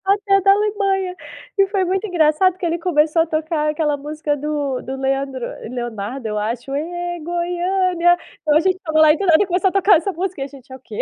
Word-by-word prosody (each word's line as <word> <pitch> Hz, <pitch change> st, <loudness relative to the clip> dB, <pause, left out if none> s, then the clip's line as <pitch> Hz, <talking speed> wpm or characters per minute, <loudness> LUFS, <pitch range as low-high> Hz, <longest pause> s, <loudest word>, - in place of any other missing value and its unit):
Até 395 Hz, 0 st, +2 dB
da 390 Hz, +1 st, +5 dB
Alemanha. 395 Hz, -2 st, 0 dB, 0.4 s
E 395 Hz, 0 st, +4 dB
foi 390 Hz, -1 st, 0 dB
muito 380 Hz, +3 st, -1 dB
engraçado 350 Hz, +1 st, +2 dB
que 370 Hz, -, -4 dB
ele 340 Hz, 0 st, -1 dB
começou 325 Hz, -1 st, +2 dB
a -, -, +2 dB
tocar 310 Hz, -1 st, -1 dB
aquela 300 Hz, -1 st, 0 dB
música 295 Hz, +1 st, -3 dB
do 290 Hz, -2 st, -3 dB
do 265 Hz, -, -6 dB
Leandro 270 Hz, -1 st, -2 dB, 0.2 s
Leonardo, 240 Hz, 0 st, -5 dB
eu 210 Hz, -1 st, -3 dB
acho: 235 Hz, +5 st, -4 dB
"Ê, 350 Hz, +3 st, -4 dB
Goiânia". 350 Hz, +1 st, +1 dB, 0.2 s
Então 300 Hz, -2 st, +1 dB
a -, -, +6 dB
gente 370 Hz, +2 st, +1 dB
estava 315 Hz, -4 st, -1 dB
lá 310 Hz, -1 st, +7 dB
e -, -, -3 dB
do 400 Hz, -, -2 dB
nada 340 Hz, +3 st, +5 dB
começou 370 Hz, +1 st, +1 dB
a -, -, -8 dB
tocar 395 Hz, -1 st, +5 dB
essa 370 Hz, +5 st, -2 dB
música. 365 Hz, -3 st, -4 dB
E -, -, 0 dB
a -, -, -7 dB
gente: 270 Hz, -2 st, -16 dB
“É -, -, -6 dB
o -, -, -13 dB
quê?”. 220 Hz, -4 st, -6 dB
330 Hz, 225 wpm, -20 LUFS, 285-370 Hz, 0.4 s, lá